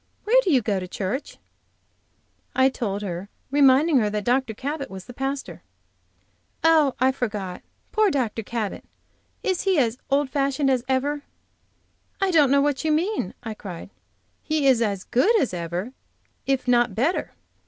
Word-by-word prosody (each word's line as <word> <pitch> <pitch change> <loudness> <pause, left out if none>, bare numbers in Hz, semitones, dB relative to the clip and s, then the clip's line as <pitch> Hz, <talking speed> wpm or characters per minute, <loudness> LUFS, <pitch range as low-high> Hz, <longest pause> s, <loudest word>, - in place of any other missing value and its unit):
Where - - +5
do 385 - 0
you 260 -5 +3
go 200 -2 0
to 185 - -6
church?" 200 +9 -4 1.2
I 260 +1 +5
told 210 -6 -3
her, 185 0 -5 0.2
reminding 280 +1 +5
her 210 -2 +1
that 210 0 -2
Dr. 245 0 +1
Cabot 280 +4 -4
was 190 +1 -9
its 245 - -10
pastor. 270 +1 -4 1.0
"Oh, 315 -4 +4
I 260 +1 +4
forgot! 210 -8 -4 0.3
Poor 435 -1 +3
Dr. 245 - -1
Cabot! 220 -1 -4 0.6
Is 375 -2 0
he 385 -3 +2
as 245 -3 +1
old 275 -1 +1
fashioned 275 0 +1
as 255 -2 +1
ever?" 280 +3 0 1.0
"I 390 -1 +1
don't 300 -5 +5
know 280 +1 +4
what 285 0 0
you 315 - +1
mean," 330 - 0
I 225 -2 -4
cried. 195 -3 -9 0.5
"He 310 -2 -1
is 260 -4 +5
as 200 -4 -1
good 425 - +3
as 255 - 0
ever, 175 +7 -4 0.5
if 270 -2 0
not 240 -4 +3
better. 280 - 0
260 Hz, 160 wpm, -24 LUFS, 215-290 Hz, 1.2 s, Where